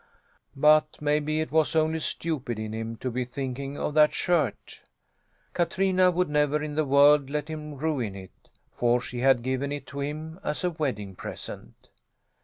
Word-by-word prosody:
But 150 +2 +4
maybe 150 +1 0
it 155 - -4
was 160 +1 +2
only 160 0 +2
stupid 150 -7 -3
in 110 0 -5
him 115 +1 -4
to 130 +3 -4
be 125 +2 -1
thinking 135 +2 -5
of 150 - -2
that 150 0 +5
shirt? 160 - -1 0.7
Katrina 185 +1 +2
would 180 +1 +1
never 150 0 +1
in 150 -1 -4
the 155 +1 +1
world 140 0 +5
let 150 0 -2
him 150 -1 -6
ruin 135 -8 -2
it, 95 -1 -13 0.3
for 120 0 +2
she 125 0 -6
had 130 -1 +3
given 130 +2 -1
it 145 0 -5
to 140 - -8
him 155 +4 -5
as 150 - -3
a 180 - +1
wedding 125 - -3
present. - - -9
145 Hz, 170 wpm, -27 LUFS, 130-155 Hz, 0.7 s, that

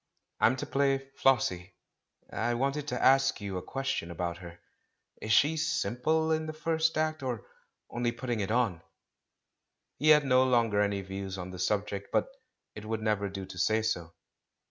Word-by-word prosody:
*'I'm 125 - +4
to 130 - -4
play 135 -1 0
'Flossie' 95 -8 +1 0.3
— - - -26
I 120 - +1
wanted 140 +4 -1
to 125 -4 -2
ask 135 0 +4
you 100 -3 -4
a - - -3
question 135 -10 -3
about 85 0 -3
her. 85 -2 -10 0.6
Is 110 - -3
she 150 +8 +4
simple 160 +1 0
in 155 0 0
the 155 - -4
first 160 +1 0
act, 155 0 0
or 125 -5 -4 0.4
only 120 0 -1
putting 120 -1 -3
it 100 - -2
on?" 110 -7 +1 1.2
He 155 +3 +3
had 150 -1 +7
no 130 -1 +5
longer 115 -5 +2
any 100 -1 0
views 95 0 -6
on 90 0 -6
the 90 - -8
subject, 100 +1 -1
but - - +1 0.4
it 105 - -9
would 110 0 -3
never 105 -2 0
do 95 0 -6
to 90 - -9
say 110 +5 +2
so. 85 -6 -2
115 Hz, 175 wpm, -30 LUFS, 100-135 Hz, 1.2 s, had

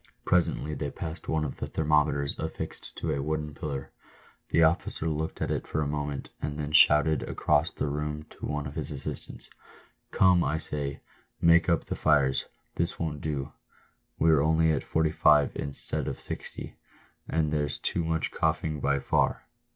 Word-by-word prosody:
Presently 85 -3 +1
they 75 0 -3
passed 80 +3 -7
one 80 -1 0
of 70 - -5
the - - -4
thermometers 75 -2 +1
affixed - - -5
to - - -1
a 70 - -1
wooden 75 0 -2
pillar. 70 -2 -5 0.6
The 80 - +4
officer 80 0 +1
looked 80 0 -2
at - - -2
it - - -2
for 75 - -1
a - - -2
moment, 75 -1 -3
and 75 0 -3
then 75 -1 -3
shouted 75 0 +5
across 75 +2 +1
the - - -3
room 75 +1 -3
to - - -7
one 75 0 -2
of 70 - -6
his 75 -2 -3
assistants, 70 -1 -7 0.3
" - - -32
Come, 90 -2 +5
I 75 - 0
say, 70 -2 -2 0.4
make 85 +1 +5
up 85 -2 +2
the - - -3
fires! 70 -3 +2 0.3
this 85 +1 0
won't 75 -3 -3
do! 70 -3 -3 0.7
we're 80 -3 +4
only 80 +1 +3
at 75 - 0
45 75 -2 +3
instead 70 -1 -1
of - - -4
60, - - -7 0.6
and 80 -1 +1
there's 75 -2 -1
too 85 - -1
much 80 -1 0
coughing 75 -2 0
by 70 0 +1
far." 70 - +1
75 Hz, 170 wpm, -28 LUFS, 75-80 Hz, 0.7 s, shouted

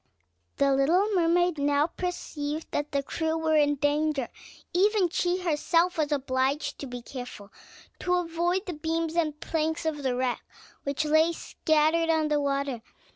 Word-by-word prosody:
The 275 -1 +3
little 350 +10 +3
mermaid 350 -2 +2
now 285 +1 +3
perceived 315 -3 -4
that 290 0 -2
the 280 -1 0
crew 320 +3 -2
were 320 -1 +1
in 290 -1 +4
danger; 290 -2 0 0.4
even 390 0 +3
she 355 +2 0
herself 335 +2 +2
was 300 -1 0
obliged 270 0 0
to 280 - -5
be 245 -1 -7
careful 245 -6 -8 0.5
to 360 0 +1
avoid 350 +2 0
the 360 - -4
beams 325 +1 -2
and 305 -3 0
planks 320 +1 -2
of 305 -2 -1
the 260 -2 0
wreck 250 -1 -1 0.4
which 280 +2 -1
lay 315 +2 +4
scattered 315 +1 +1
on 315 -1 +2
the 295 -1 +2
water. 275 -3 -1
310 Hz, 155 wpm, -27 LUFS, 285-335 Hz, 0.5 s, in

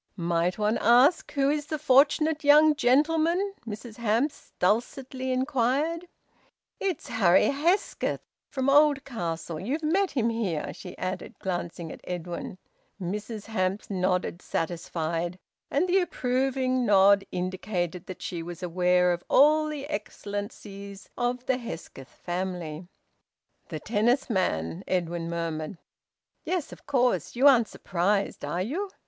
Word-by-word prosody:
"Might 170 0 0
one 215 +1 +1
ask 250 - +4
who 275 0 +2
is 295 -1 -2
the 310 - -2
fortunate 300 +2 +3
young 300 +2 +7
gentleman?" 320 +8 +2
Mrs 220 +1 -7
Hamps 235 +5 -1
dulcetly 255 +6 -1
inquired. 275 +6 0 0.7
"It's 380 -6 -3
Harry 185 -5 +4
Hesketh, 330 +8 0 0.3
from 265 -1 -2
Oldcastle... 260 - +1
You've 275 - -3
met 375 +5 +2
him 235 -4 0
here," 175 -11 -2
she - - -10
added, 185 0 -5
glancing 175 -3 -4
at - - -10
Edwin. 175 0 -5 0.4
Mrs 210 +4 -5
Hamps 200 -2 -2
nodded, 180 -2 0
satisfied, 170 +1 -3 0.3
and 305 +6 +1
the 370 +2 +4
approving 255 -5 0
nod 200 -2 +5
indicated 180 -1 -3
that 185 - -8
she 170 -2 -4
was 175 +2 -8
aware 180 0 +3
of 175 - -5
all 305 +2 +5
the 295 -2 -5
excellences 205 -3 -6
of 245 +1 -2
the 260 -1 +1
Hesketh 165 - -8
family. 175 -2 -5 0.8
"The - - -4
tennis 240 +4 +1
man!" 80 - -1
Edwin 170 -2 -1
murmured. 165 0 -3 0.7
"Yes, 360 -5 -2
of - - -16
course! 245 - +1
You 255 +4 +2
aren't 240 -5 +6
surprised, 195 +2 -1
are 180 +2 -1
you?" 355 - -3
215 Hz, 125 wpm, -27 LUFS, 180-275 Hz, 0.8 s, young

